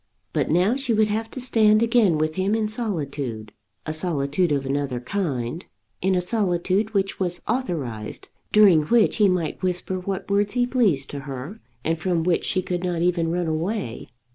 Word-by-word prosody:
But -, -, 0 dB
now 180 Hz, +8 st, +3 dB
she 270 Hz, -4 st, 0 dB
would 215 Hz, 0 st, +3 dB
have 220 Hz, +2 st, -2 dB
to 260 Hz, -, -7 dB
stand 220 Hz, -3 st, +4 dB
again 230 Hz, -8 st, +3 dB
with 155 Hz, +1 st, 0 dB
him 190 Hz, +5 st, 0 dB
in 220 Hz, -1 st, 0 dB
solitude, 140 Hz, -, -3 dB, 0.3 s
a 155 Hz, -, -2 dB
solitude 155 Hz, 0 st, 0 dB
of 140 Hz, -2 st, 0 dB
another 135 Hz, -2 st, -1 dB
kind, 140 Hz, -1 st, -3 dB, 0.4 s
in 190 Hz, +1 st, +2 dB
a 180 Hz, -, +2 dB
solitude 195 Hz, +1 st, 0 dB
which 195 Hz, 0 st, 0 dB
was 175 Hz, -2 st, -1 dB
authorized, 150 Hz, -, -3 dB, 0.2 s
during 200 Hz, -7 st, +6 dB
which 230 Hz, +4 st, +3 dB
he 210 Hz, -3 st, +5 dB
might 175 Hz, -4 st, -1 dB
whisper 185 Hz, 0 st, -2 dB
what 190 Hz, +1 st, -4 dB
words 205 Hz, +1 st, +1 dB
he 245 Hz, 0 st, +2 dB
pleased 205 Hz, -, +1 dB
to 145 Hz, -, -5 dB
her, 135 Hz, -, -6 dB, 0.2 s
and 165 Hz, 0 st, 0 dB
from 175 Hz, -1 st, 0 dB
which 175 Hz, 0 st, +1 dB
she 185 Hz, -, 0 dB
could 180 Hz, 0 st, -3 dB
not 175 Hz, -2 st, -1 dB
even 175 Hz, -2 st, +1 dB
run 175 Hz, +1 st, -1 dB
away. 160 Hz, -, -3 dB
180 Hz, 180 wpm, -24 LUFS, 155-210 Hz, 0.4 s, during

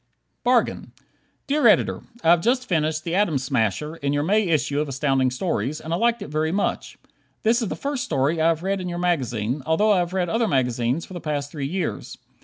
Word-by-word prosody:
"Bargain" 245 Hz, -1 st, +1 dB, 0.5 s
Dear 295 Hz, +1 st, +3 dB
Editor: -, -, +3 dB, 0.2 s
I 165 Hz, -, +5 dB
have 170 Hz, -1 st, +5 dB
just 250 Hz, +4 st, +1 dB
finished 155 Hz, -2 st, 0 dB
"The 170 Hz, -, -3 dB
Atom 185 Hz, -6 st, +2 dB
Smasher," 130 Hz, -, -1 dB
in 140 Hz, -2 st, -1 dB
your 145 Hz, 0 st, +1 dB
May 210 Hz, +6 st, +2 dB
issue 145 Hz, -3 st, +1 dB
of 150 Hz, -, -3 dB
Astounding 135 Hz, -1 st, +1 dB
Stories, 135 Hz, -, -2 dB
and 160 Hz, -, -5 dB
liked 230 Hz, +3 st, +1 dB
it -, -, -9 dB
very 155 Hz, +1 st, 0 dB
much. 200 Hz, +3 st, -2 dB, 0.5 s
This 235 Hz, +2 st, +3 dB
is 225 Hz, -, -1 dB
the -, -, -3 dB
first 280 Hz, -1 st, -3 dB
story 145 Hz, -, 0 dB
that 160 Hz, -, +1 dB
I -, -, +6 dB
have 165 Hz, 0 st, +1 dB
read 195 Hz, 0 st, -1 dB
in 180 Hz, -, -4 dB
your 175 Hz, -, -4 dB
magazine, 130 Hz, -8 st, -1 dB
although 185 Hz, +9 st, +2 dB
I 195 Hz, -, +4 dB
have 175 Hz, 0 st, -2 dB
read 185 Hz, -2 st, 0 dB
other 225 Hz, +5 st, +1 dB
magazines 125 Hz, -, 0 dB
for -, -, -12 dB
the 175 Hz, -, -6 dB
past 145 Hz, -2 st, -3 dB
three 140 Hz, -3 st, -4 dB
years. 180 Hz, +2 st, -4 dB
160 Hz, 215 wpm, -23 LUFS, 140-190 Hz, 0.5 s, I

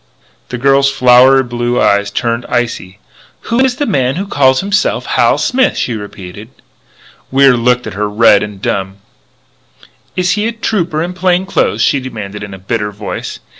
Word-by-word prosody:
The 125 Hz, -, -4 dB
girl's 135 Hz, +2 st, +3 dB
flower 130 Hz, 0 st, +5 dB
blue 120 Hz, 0 st, -2 dB
eyes 100 Hz, 0 st, +2 dB
turned 115 Hz, +3 st, -2 dB
icy: 115 Hz, -6 st, -3 dB, 0.4 s
"Who 230 Hz, +2 st, -2 dB
is 260 Hz, -1 st, +2 dB
the 290 Hz, -, -2 dB
man 135 Hz, -, 0 dB
who 190 Hz, +4 st, -3 dB
calls 130 Hz, -7 st, +2 dB
himself 200 Hz, +1 st, 0 dB
Hal -, -, +2 dB
Smith?" 255 Hz, 0 st, +1 dB
she 120 Hz, -, -1 dB
repeated. 105 Hz, 0 st, -9 dB, 0.8 s
Wier 135 Hz, -1 st, +4 dB
looked 125 Hz, +1 st, +1 dB
at -, -, -6 dB
her, 105 Hz, +1 st, -2 dB
red 105 Hz, -1 st, +4 dB
and 105 Hz, -2 st, -6 dB
dumb. 95 Hz, 0 st, -3 dB, 1.2 s
"Is 180 Hz, 0 st, 0 dB
he 210 Hz, +1 st, 0 dB
a 230 Hz, -, -3 dB
Trooper 175 Hz, -8 st, -2 dB
in 175 Hz, +1 st, -4 dB
plain 180 Hz, 0 st, 0 dB
clothes?" 115 Hz, -, 0 dB
she 140 Hz, -, +2 dB
demanded 105 Hz, -6 st, -7 dB
in 100 Hz, -2 st, -7 dB
a -, -, -11 dB
bitter 105 Hz, +2 st, -3 dB
voice. 105 Hz, 0 st, -6 dB
125 Hz, 170 wpm, -13 LUFS, 105-170 Hz, 1.2 s, flower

